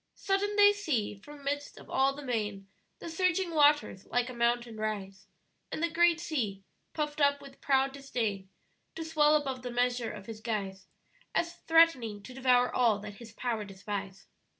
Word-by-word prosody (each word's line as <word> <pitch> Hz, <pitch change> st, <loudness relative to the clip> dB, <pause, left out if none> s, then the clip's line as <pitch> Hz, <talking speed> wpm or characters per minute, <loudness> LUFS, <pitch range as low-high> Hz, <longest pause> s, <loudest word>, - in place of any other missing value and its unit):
"Sudden 400 Hz, +1 st, 0 dB
they 410 Hz, 0 st, +7 dB
see 305 Hz, -, -1 dB
from 285 Hz, +8 st, -13 dB
midst 285 Hz, +1 st, -3 dB
of -, -, -13 dB
all 270 Hz, +1 st, +2 dB
the 290 Hz, -, -8 dB
main 210 Hz, -5 st, -2 dB, 0.3 s
The -, -, -9 dB
surging 365 Hz, +1 st, 0 dB
waters 295 Hz, -9 st, +3 dB
like 245 Hz, +1 st, 0 dB
a -, -, -9 dB
mountain 235 Hz, -1 st, 0 dB
rise, 200 Hz, -2 st, -4 dB, 0.4 s
And 315 Hz, -, -3 dB
the 335 Hz, -, +1 dB
great 340 Hz, 0 st, +4 dB
sea, 220 Hz, -, -3 dB, 0.3 s
puff'd 300 Hz, -1 st, -2 dB
up 285 Hz, 0 st, +4 dB
with 275 Hz, -1 st, -14 dB
proud 270 Hz, -1 st, +2 dB
disdain 225 Hz, -8 st, -3 dB, 0.5 s
To 325 Hz, -, -4 dB
swell 305 Hz, -1 st, +4 dB
above 270 Hz, -4 st, -1 dB
the 250 Hz, -, -5 dB
measure 245 Hz, -1 st, 0 dB
of 205 Hz, -2 st, -9 dB
his 220 Hz, 0 st, -8 dB
guise, 195 Hz, -4 st, -4 dB, 0.5 s
As 340 Hz, 0 st, 0 dB
threatening 275 Hz, -11 st, +4 dB
to 255 Hz, -, -10 dB
devour 250 Hz, -1 st, +3 dB
all 235 Hz, -4 st, +3 dB
that 205 Hz, 0 st, -9 dB
his 230 Hz, -2 st, -12 dB
power 230 Hz, -2 st, -2 dB
despise." 195 Hz, -1 st, -6 dB
250 Hz, 175 wpm, -30 LUFS, 210-300 Hz, 0.5 s, they